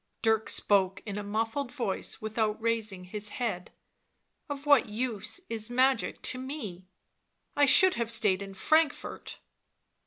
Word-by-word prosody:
Dirk 220 -1 +2
spoke 195 -2 +2
in 205 -1 -4
a - - -5
muffled 225 +6 -2
voice, 235 -8 -3
without 220 0 -1
raising 220 -5 -1
his 210 +3 -5
head. 205 -8 -3 0.4
" - - -48
Of 285 0 -5
what 285 -6 +5
use 215 - -2 0.3
magic 255 +2 +1
to 255 - -4
me? 220 - -7 0.7
I 285 0 +4
should 375 +7 +7
have 235 -1 -2
stayed 210 -4 +2
in 195 -1 -8
Frankfort." 315 +8 0
220 Hz, 135 wpm, -29 LUFS, 205-255 Hz, 0.7 s, should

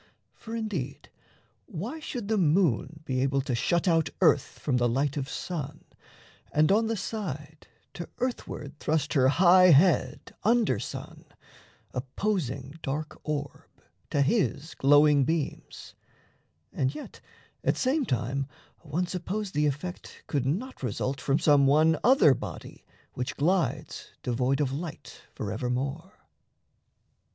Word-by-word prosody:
For, 225 0 -8
indeed, 190 - -4 0.6
Why 235 - -5
should 245 -8 -5
the 220 -1 +1
moon 155 - +2
be 130 -3 -1
able 135 0 +1
to 130 -1 -3
shut 170 +10 +1
out 165 -3 +3
Earth 140 - +3
from 130 -4 0
the 120 -1 +2
light 135 +4 0
of 140 -2 -3
sun, 160 -4 -5 0.7
and 155 +3 +3
on 220 +3 +3
the 225 0 -1
side 155 -8 -6 0.3
To 170 - -7
earthward 155 - -4
thrust 155 -1 0
her 130 -4 +4
high 180 +5 +6
head 155 -4 +3
under 230 +1 +2
sun, - - -7 0.7
Opposing 140 - -3
dark 150 +3 -4
orb 145 -2 -4 0.4
to 140 - +2
his 160 - 0
glowing 145 0 +5
beams 155 +1 -3 0.8
And 135 +2 -1
yet, 150 - -9 0.4
at - - +1
same 275 +4 +1
time, 130 - -1 0.3
one 165 +3 -2
suppose 185 +3 -4
the 150 -2 +1
effect 150 +6 -5
Could 140 -4 -1
not 220 - -3
result 130 +2 -2
from 140 0 +2
some 145 -3 +4
one 155 +3 +4
other 255 - +6
body - - -8 0.3
Which 125 +1 -4
glides 175 +4 -1
devoid 125 +3 0
of 135 -3 0
light 160 +2 -7
forevermore? 125 - -3
150 Hz, 130 wpm, -28 LUFS, 135-185 Hz, 0.8 s, high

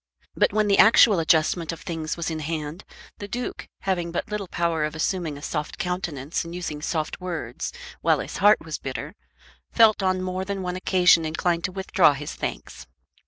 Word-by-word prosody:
But - - +3
when 215 +1 +2
the 200 - +3
actual 220 -3 +7
adjustment 160 0 +2
of 165 - -8
things 165 -4 -4
was 170 -1 -2
in 160 - -3
hand, 155 +2 -4 0.3
the 205 - -6
Duke, 245 +4 -5
having 175 -3 -1
but 175 - -4
little 210 -2 -3
power 170 -3 0
of 150 +1 -2
assuming 160 -2 -2
a 145 - -12
soft 150 -1 -4
countenance 175 -5 -3
and 170 +1 -8
using 155 -4 -5
soft 155 +2 -3
words 165 -10 -4 0.3
while - - +3
his - - -5
heart 205 -2 +4
was 155 -1 -5
bitter, 140 +4 -5 0.6
felt 220 -3 +5
on 185 -1 +1
more 185 0 -2
than 195 0 -4
one 180 0 -3
occasion 180 -2 +4
inclined 170 +2 -1
to 190 - -2
withdraw 190 -4 +3
his 145 +1 -6
thanks. - - -6
170 Hz, 185 wpm, -24 LUFS, 155-190 Hz, 0.6 s, actual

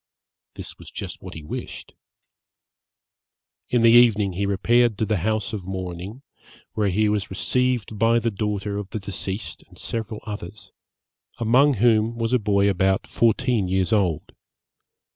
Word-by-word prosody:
This - - -9
was - - -11
just - - -7
what - - -9
he 80 - -8
wished. 75 - -7 1.8
In 120 -2 +2
the 115 - +7
evening 110 -5 +5
he 100 +3 -1
repaired 115 +3 +2
to 110 - 0
the 110 -1 0
house 110 +4 -1
of 95 -4 -5
mourning, 95 +5 -6 0.5
where 105 -2 +1
he 105 +3 +2
was 105 -1 -1
received 120 +1 -1
by 115 +1 +4
the 115 0 0
daughter 105 0 -3
of 100 -2 -7
the 110 - -4
deceased 100 +1 -6
and - - -19
several 110 -2 -5
others, 105 -1 -8 0.7
among 130 +5 +4
whom 115 +1 +2
was 115 +1 -1
a 125 - +4
boy 100 -2 +2
about 95 0 +1
fourteen 115 -2 +1
years 95 +3 0
old. 95 -7 0
105 Hz, 150 wpm, -23 LUFS, 95-115 Hz, 1.8 s, the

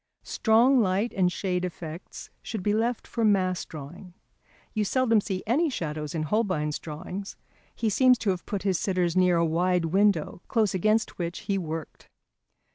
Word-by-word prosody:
Strong 240 +4 +3
light 200 +3 0
and 180 -2 +2
shade 180 -1 -2
effects 170 -1 -7
should 215 -5 -5
be 205 - +1
left 230 +2 0
for 230 - -3
mass 185 -4 +2
drawing. 165 +4 -10 0.6
You 215 - 0
seldom 230 0 +2
see 190 -2 -4
any 300 +9 +2
shadows 155 - -4
in 155 - -1
Holbein's 155 -5 0
drawings; 180 +6 -7 0.4
he 230 - -1
seems 250 +4 +4
to 210 -3 0
have 185 -1 -5
put 200 -3 -3
his 190 -3 +1
sitters 180 -3 0
near 180 -2 +4
a 170 - +3
wide 175 +2 +1
window, 185 -1 +1
close 220 -4 +1
against 215 +4 +1
which 170 0 -3
he 200 - -1
worked. 160 -4 -5
185 Hz, 165 wpm, -27 LUFS, 170-215 Hz, 0.6 s, seems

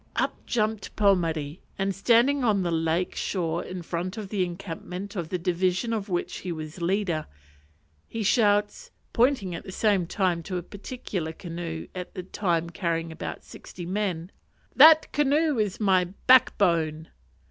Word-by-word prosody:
Up - - -2
jumped 220 -3 -1
Pomare, 165 -6 +1 0.2
and 195 0 0
standing 240 +7 +3
on 205 -5 +2
the 175 - -1
lake 165 +2 0
shore 170 -3 -1
in 185 -1 -7
front 175 +4 -4
of 210 -3 -6
the 195 -3 0
encampment 180 +2 -6
of 170 -4 -3
the 180 - -1
division 185 +5 0
of 210 -2 -3
which 175 -1 -2
he 180 - -5
was 155 +1 -7
leader, 175 -3 0 0.8
he 225 -1 -4
shouts 205 -1 +2 0.2
pointing 235 -7 +2
at 165 - -6
the - - -8
same 195 -3 +1
time 180 -3 0
to 180 +2 -4
a 175 - -4
particular 195 -4 -5
canoe 165 -2 -6
at 180 -1 -7
the 185 - -5
time 170 -3 -1
carrying 165 -2 -2
about 160 - -6
sixty 175 - -10
men 185 -2 -2 0.4
"That 315 +3 +8
canoe 295 -1 +2
is 210 0 -1
my 190 -4 +3
back 250 +8 +4
bone." 160 -4 +1
185 Hz, 160 wpm, -26 LUFS, 170-210 Hz, 0.8 s, That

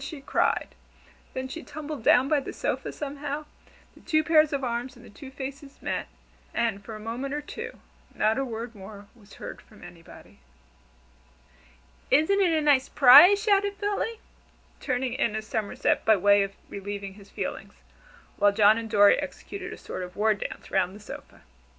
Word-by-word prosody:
she 285 +1 -7
cried. 275 - 0 0.7
Then 260 0 -3
she 325 +5 -7
tumbled 300 -2 -7
down 250 +4 +5
by 300 0 +2
the 275 - -7
sofa - - -3
somehow, 290 +1 -5 0.5
the - - -18
two 310 -2 +1
pairs 310 -1 +4
of 280 -2 -2
arms 245 +2 -3
and 245 0 -15
the - - -14
two 265 +6 -11
faces 275 +1 -8
met, - - -3 0.5
and 225 -4 -1
for 220 +2 -8
a - - -8
moment 245 +6 -4
or 295 - -3
two 295 - -8 0.4
not 220 +4 +1
a - - 0
word 230 -1 -6
more 200 0 -11
was 210 -3 -17
heard - - -8
from 215 - -18
anybody. 170 -1 -14 1.7
"Isn't 315 +9 +3
a 330 -4 +2
nice 280 -3 +3
'prise?" 295 +10 +8
shouted 405 -1 +2
Philly, 415 +2 -2 0.6
turning 255 0 -2
a 220 -2 +1
somerset 215 -1 -1
by 220 - +5
way 200 +1 +4
of 195 0 -3
relieving 200 0 -6
his 200 0 -16
feelings, - - -6 0.6
while 205 0 +4
John 210 +1 +5
and 225 -1 -7
Dorry 205 -2 +6
executed 365 +6 -7
a - - -8
sort - - -7
of 180 0 -8
war 215 +1 +3
dance 205 - -7
round 185 +2 0
the - - -11
sofa. 210 - -11
255 Hz, 170 wpm, -26 LUFS, 210-295 Hz, 1.7 s, prise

